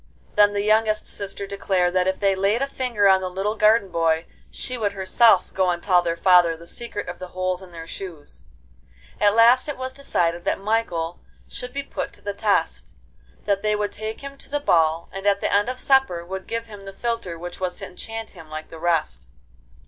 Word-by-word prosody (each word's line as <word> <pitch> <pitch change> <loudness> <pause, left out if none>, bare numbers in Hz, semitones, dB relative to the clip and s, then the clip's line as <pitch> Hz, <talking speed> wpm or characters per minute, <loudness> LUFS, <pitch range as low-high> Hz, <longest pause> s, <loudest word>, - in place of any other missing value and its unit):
Then 205 0 +5
the 200 0 -1
youngest 215 0 +2
sister 200 0 -3
declared 190 -3 0
that 185 0 +2
if 190 - 0
they 195 -1 +3
laid 200 +6 +1
a - - -1
finger 245 -7 +1
on 190 -1 +5
the 185 - -3
little 195 +3 -2
garden 215 -2 +4
boy, 165 -1 +1 0.2
she 255 - -4
would 210 -4 -1
herself 195 0 +3
go 185 -1 +2
and 175 -1 -2
tell 180 -3 +4
their 170 -1 -2
father 175 -3 +5
the 170 - -13
secret 235 +2 -5
of 180 - -7
the 185 - -6
holes 185 0 -2
in 185 -2 -13
their 165 -1 -8
shoes. 165 -4 -9 0.8
At 205 0 +4
last 240 +5 +6
it 290 - -4
was 260 0 -4
decided 175 -11 -1
that - - 0
Michael 195 -6 -1 0.3
should 250 - -6
be 280 +2 -4
put - - -5
to - - -12
the 205 - -4
test; 205 0 -1 0.5
that 200 -1 +1
they 215 0 +1
would 210 -1 -1
take 220 +1 -6
him 275 0 -9
to - - -11
the 290 +1 -1
ball, 165 - +2
and 195 +1 -4
at 200 0 +3
the - - -1
end 205 +4 +3
of 255 0 -5
supper 265 -13 +2
would 190 +1 -6
give 230 0 -3
him 205 -3 -12
the 195 - -8
philtre 230 -6 -3
which 175 +1 -8
was 180 -1 -2
to - - -7
enchant 225 +4 -6
him 165 -5 -13
like 155 0 -7
the 165 - -9
rest. 165 - -1
195 Hz, 215 wpm, -23 LUFS, 180-220 Hz, 0.8 s, last